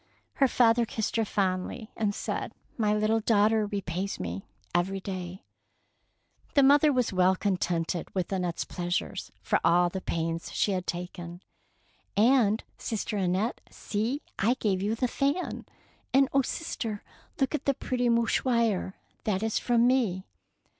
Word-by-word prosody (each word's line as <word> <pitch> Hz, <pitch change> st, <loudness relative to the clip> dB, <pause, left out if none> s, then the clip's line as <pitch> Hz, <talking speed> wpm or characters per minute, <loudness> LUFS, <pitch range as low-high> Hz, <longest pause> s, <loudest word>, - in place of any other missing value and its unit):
Her 270 Hz, -, +5 dB
father 235 Hz, -1 st, +4 dB
kissed 220 Hz, -1 st, -3 dB
her 225 Hz, -, +2 dB
fondly 200 Hz, +3 st, -2 dB
and 205 Hz, -2 st, 0 dB
said, -, -, -3 dB
— -, -, -38 dB
" -, -, -34 dB
My 210 Hz, -2 st, +2 dB
little 215 Hz, +1 st, +2 dB
daughter 215 Hz, 0 st, +3 dB
repays 195 Hz, -1 st, -3 dB
me 90 Hz, +1 st, -5 dB, 0.3 s
every 185 Hz, +3 st, +1 dB
day.'^ 185 Hz, -1 st, -6 dB, 1.1 s
The 280 Hz, -, +6 dB
mother 290 Hz, +2 st, +6 dB
was 250 Hz, -6 st, +1 dB
well 185 Hz, 0 st, +4 dB
contented 180 Hz, -3 st, -1 dB
with 185 Hz, -2 st, -1 dB
Annette^ 180 Hz, -3 st, -1 dB
s -, -, -2 dB
pleasure 175 Hz, 0 st, -2 dB, 0.3 s
for -, -, +2 dB
all 175 Hz, +1 st, +4 dB
the 190 Hz, +2 st, -5 dB
pains 165 Hz, -1 st, -2 dB
she 205 Hz, -, +1 dB
had 185 Hz, -2 st, -2 dB
taken. 175 Hz, 0 st, -5 dB, 0.4 s
" -, -, -38 dB
And, 225 Hz, -1 st, +4 dB, 0.2 s
sister 220 Hz, 0 st, -3 dB
Annette, 190 Hz, +4 st, 0 dB
see, 225 Hz, +7 st, -3 dB, 0.2 s
I 230 Hz, +6 st, +3 dB
gave 200 Hz, -7 st, 0 dB
you 210 Hz, +3 st, 0 dB
the 250 Hz, +2 st, 0 dB
fan.'' 280 Hz, +8 st, -1 dB, 0.5 s
"And 275 Hz, 0 st, +5 dB
oh, 275 Hz, -, +5 dB
sister, 240 Hz, -6 st, -4 dB, 0.4 s
look 270 Hz, +1 st, +1 dB
at 305 Hz, -, -2 dB
the 275 Hz, -, +2 dB
pretty 245 Hz, -2 st, -1 dB
mouchoir; 230 Hz, -4 st, +1 dB, 0.3 s
that 205 Hz, -1 st, 0 dB
is 225 Hz, -1 st, 0 dB
from 240 Hz, -1 st, +3 dB
me." 225 Hz, -8 st, +2 dB
210 Hz, 155 wpm, -28 LUFS, 185-235 Hz, 1.1 s, The